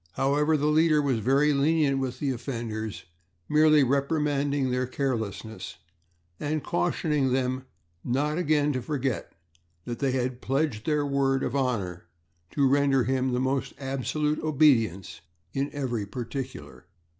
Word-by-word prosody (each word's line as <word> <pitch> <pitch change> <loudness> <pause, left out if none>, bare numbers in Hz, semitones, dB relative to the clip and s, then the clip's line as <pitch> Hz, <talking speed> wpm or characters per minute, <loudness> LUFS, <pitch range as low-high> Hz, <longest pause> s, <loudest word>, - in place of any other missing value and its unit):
However, 150 +3 +2
the 145 - -1
leader 155 0 +4
was 135 -5 +1
very 140 +6 +3
lenient 140 -1 +2
with 130 -2 -3
the 140 0 -1
offenders, 115 -4 -5 0.4
merely 155 -1 +5
reprimanding 140 0 0
their 125 0 0
carelessness 110 -7 -4 0.6
and 150 0 -2
cautioning 150 -6 0
them 130 0 -1 0.4
not 145 +6 0
again 150 -3 +2
to 130 - -2
forget 135 -2 -2 0.5
that 120 -1 -5
they 135 -2 +1
had 125 -1 -2
pledged 135 -5 -1
their 150 -2 +1
word 135 -1 +1
of 125 - -2
honor 105 -10 -1 0.4
to 140 -2 +2
render 140 -1 +3
him 130 +1 0
the 125 - 0
most 130 +1 -1
absolute 140 +3 -1
obedience 125 - +2 0.3
in 140 +1 -1
every 120 -8 -3
particular. 125 - -7
135 Hz, 135 wpm, -27 LUFS, 125-145 Hz, 0.6 s, merely